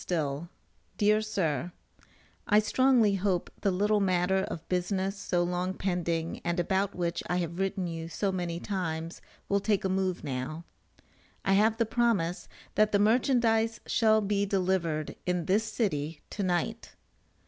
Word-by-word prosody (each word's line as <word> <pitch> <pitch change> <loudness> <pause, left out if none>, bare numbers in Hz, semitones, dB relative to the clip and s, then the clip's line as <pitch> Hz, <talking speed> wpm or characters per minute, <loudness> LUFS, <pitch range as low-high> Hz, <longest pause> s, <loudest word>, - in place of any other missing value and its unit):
STILL, 155 -1 -2 0.5
DEAR 215 +1 +4
SIR: 175 - -1 0.8
I 210 - +5
strongly 225 0 +4
hope 190 -2 0
the 200 - +2
little 205 +3 +2
matter 185 -1 +2
of 165 0 -7
business 190 +2 -1
so 175 -3 0
long 180 +1 -1
pending 170 -3 -2
and 175 +1 -1
about 190 +2 0
which 170 -1 -1
I 180 - 0
have 170 0 -3
written 195 -1 -1
you 165 -1 -5
so 195 +4 -1
many 175 -2 -3
times, 165 -4 -4 0.3
will 200 - +2
take 200 -1 0
a - - +1
move 185 -1 -1
now. 145 +4 -4 0.8
I 195 - +3
have 215 +3 +4
the 230 - +2
promise 205 -7 0 0.3
that 215 0 +3
the 205 - +4
merchandize 225 0 +2
shall 220 -2 +3
be 200 0 0
delivered 185 -6 0
in 180 -2 0
this 205 +5 +2
city 155 - -2
to 210 - -4
night. 185 +5 -2
190 Hz, 150 wpm, -29 LUFS, 170-210 Hz, 0.8 s, I